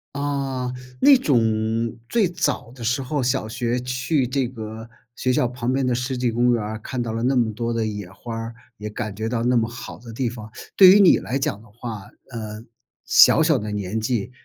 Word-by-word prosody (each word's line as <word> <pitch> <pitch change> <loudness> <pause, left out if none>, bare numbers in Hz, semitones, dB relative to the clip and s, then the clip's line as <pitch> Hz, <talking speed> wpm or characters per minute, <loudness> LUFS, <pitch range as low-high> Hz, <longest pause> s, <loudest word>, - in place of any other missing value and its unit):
啊， 135 -3 -2 0.3
那 280 -2 +8
种 130 - +2 0.6
最 225 - +2
早 125 -8 -2
的 125 - -14
时 125 +4 0
候， 145 +2 -2
小 125 -3 0
学 120 +2 -1
去 130 +3 0
这 130 +1 -1
个 110 -1 -8 0.2
学 130 +1 0
校 125 - +2
旁 125 +1 -2
边 135 0 +1
的 125 - +1
湿 125 +2 -2
地 125 -2 0
公 120 +1 +2
园 115 - 0
儿， 110 +1 -5
看 120 +2 -4
到 115 - -4
了 115 +1 -3
那 135 +2 +2
么 115 -3 +2
多 115 +2 -3
的 115 -1 0
野 105 -4 -5
花 115 +5 -8
儿， 115 0 -5 0.2
也 105 0 -6
感 105 0 -5
觉 110 +3 -4
到 115 0 -1
那 125 0 +3
么 115 -1 +1
好 120 +2 -9
的 115 0 -11
地 120 +1 -1
方。 110 -3 -9 0.3
对 190 -2 +10
于 200 +2 +7
你 185 - +7
来 135 - -3
讲 110 -6 -2
的 110 - -18
话， 110 -2 -8 0.2
呃， 110 -2 -6 0.4
小 - - +6
小 - - +3
的 105 0 -4
年 100 +1 -3
纪， 115 0 -2
120 Hz, 235 characters per minute, -22 LUFS, 110-130 Hz, 0.6 s, 对